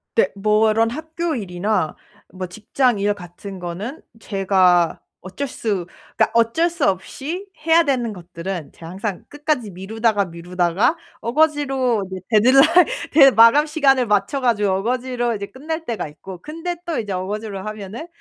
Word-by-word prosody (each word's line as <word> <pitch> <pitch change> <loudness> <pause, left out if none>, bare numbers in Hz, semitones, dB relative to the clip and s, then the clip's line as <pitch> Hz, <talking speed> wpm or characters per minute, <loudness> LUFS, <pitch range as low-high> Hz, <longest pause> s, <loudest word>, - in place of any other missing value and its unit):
네. 465 - +3
뭐 215 +2 +3
이런 225 +1 +2
학교 320 +3 -3
일이나 185 -4 -1 0.4
뭐 185 0 -5
직장 215 +5 0
일 205 +1 +1
같은 190 0 -10
거는 185 - -6 0.2
제가 185 -5 +2 0.2
어쩔 195 +10 -5
수 200 -8 -3 0.3
그러니까 220 - +2
어쩔 235 +9 +3
수 335 -4 -1
없이 280 - -3 0.2
해야 330 +1 +5
되는 250 -7 -1
것들은 175 -2 -6
제가 165 0 -10
항상 195 0 -5
끝까지 290 -7 -2
미루다가, 205 +3 0
미루다가 175 - 0 0.2
억지로 270 -5 +1
이제 185 -1 -6
데드라인 270 +10 +6 0.3
데 275 -3 +8
마감 230 +7 +6
시간을 275 -5 +3
맞춰 205 +6 +1
가지고 210 -5 +1
억지로 250 -2 -1
이제 200 -1 -5
끝날 315 +7 -5
때가 230 - -3
있고 180 +5 -10
근데 330 - -5
또 335 -3 -2
이제 210 -3 -4
억지로 195 +2 -4
하면은 215 - -7
220 Hz, 315 characters per minute, -21 LUFS, 190-275 Hz, 0.4 s, 데